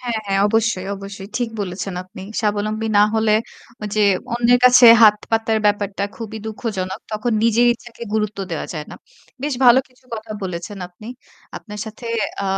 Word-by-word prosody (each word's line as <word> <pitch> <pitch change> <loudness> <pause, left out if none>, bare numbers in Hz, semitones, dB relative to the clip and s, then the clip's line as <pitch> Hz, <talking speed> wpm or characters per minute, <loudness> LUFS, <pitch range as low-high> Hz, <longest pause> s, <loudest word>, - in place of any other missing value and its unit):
হ্যাঁ, 240 -3 -2
হ্যাঁ 195 0 +1
অবশ্যই, 215 -3 0
অবশ্যই। 195 0 -9
ঠিক 245 -2 -1
বলেছেন 190 0 -4
আপনি। 185 0 -12 0.2
স্বাবলম্বী 215 +1 -1
না - - +7
হলে 220 -1 +2 0.6
যে 215 - +1 0.3
অন্যের 240 +1 +4
কাছে 250 -1 +8 0.2
হাত 210 -1 +8
পাতার 225 0 +1
ব্যাপারটা 205 -1 0
খুবই 220 -1 -7
দুঃখজনক 205 -4 -4
তখন 215 +3 -1
নিজের 230 +1 +4
ইচ্ছাকে 235 0 -14
গুরুত্ব 210 -2 -1
দেওয়া 165 - -3
যায় 155 -3 -5
না। - - -8 0.5
বেশ 290 -1 -1
ভালো 245 +1 +8
কিছু 255 0 -29
কথা 220 0 -7
বলেছেন 185 +2 -5
আপনি। 180 +4 -15 0.5
আপনার 210 -1 -8
সাথে 220 +2 -9 0.4
আ - - -2
215 Hz, 160 wpm, -20 LUFS, 195-230 Hz, 0.6 s, কাছে